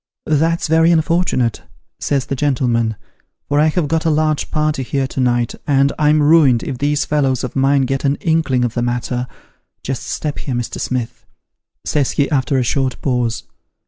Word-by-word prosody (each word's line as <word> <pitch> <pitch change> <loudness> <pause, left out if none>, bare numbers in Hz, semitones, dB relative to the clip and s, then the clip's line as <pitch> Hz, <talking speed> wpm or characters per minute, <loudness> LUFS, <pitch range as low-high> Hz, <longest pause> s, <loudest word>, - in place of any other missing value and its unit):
* - - -62
That's 165 +3 +1
very 165 +1 +4
unfort'nate,' 165 -7 +1 0.4
says 140 -3 -1
the 135 - -3
gentleman, 120 -5 0 0.3
' - - -53
for 145 0 +1
I 155 - +4
have 160 0 0
got 160 +2 0
a 165 - +1
large 155 -1 0
party 150 -2 0
here 135 +1 -1
to 130 - -6
night, 120 -2 +1
and 140 -1 +3
I'm 150 0 +3
ruined 145 -6 +4
if 125 - -5
these 145 +1 0
fellows 135 -4 0
of 125 - -5
mine 135 0 +3
get 135 +1 -2
an 140 0 +2
inkling 155 -7 +1
of 120 - -3
the 120 - -1
matter 125 +1 -2 0.6
just 135 -1 -3
step 150 -2 -3
here, 130 - -4
Mr. 120 -1 -4
Smith,' 120 -2 -3 0.6
says 145 -3 0
he, 140 - +1
after 135 -1 +1
a 130 - +2
short 130 +1 -1
pause. 125 -4 -1
140 Hz, 185 wpm, -18 LUFS, 125-150 Hz, 0.6 s, very